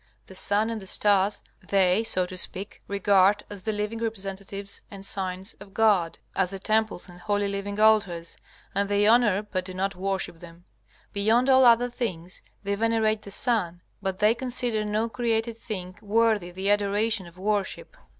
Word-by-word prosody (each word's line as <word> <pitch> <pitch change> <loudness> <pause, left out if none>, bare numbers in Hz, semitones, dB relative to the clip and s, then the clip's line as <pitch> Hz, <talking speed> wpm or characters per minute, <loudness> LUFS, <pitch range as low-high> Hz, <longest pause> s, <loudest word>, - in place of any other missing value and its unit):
The - - -13
sun 205 +4 +1
and 225 -2 -4
the 190 - -11
stars 200 0 +2 0.2
they, 190 +1 +2
so 185 -5 +1
to 185 +1 -8
speak, 185 +2 -3
regard 200 0 +3
as 200 -2 -5
the 220 - -2
living 210 +2 -3
representatives 200 -2 -3
and 195 -1 -8
signs 190 0 -1
of 200 -1 -14
God, 200 -7 +3 0.2
as 190 -2 +1
the 195 - -5
temples 215 -1 0
and 175 -1 -13
holy 205 +3 0
living 200 +1 -4
altars, 200 -6 +2 0.4
and 200 +1 0
they 205 0 +2
honor 215 -3 +4
but 185 -3 -3
do 185 0 -8
not 195 +1 -1
worship 190 -2 -2
them. 170 +1 -14 0.5
Beyond 225 +6 +3
all 260 0 +6
other 240 +1 +5
things 185 -8 -4 0.2
they 200 0 -1
venerate 220 0 +1
the 205 - -10
sun, 195 -6 0 0.2
but 190 -1 -2
they 210 +3 +4
consider 245 -3 +1
no 210 +2 0
created 230 -1 -1
thing 185 -5 -6
worthy 215 -3 +1
the 190 +3 -1
adoration 205 0 +1
of 170 +1 -16
worship. 205 - -2
205 Hz, 170 wpm, -26 LUFS, 190-220 Hz, 0.5 s, all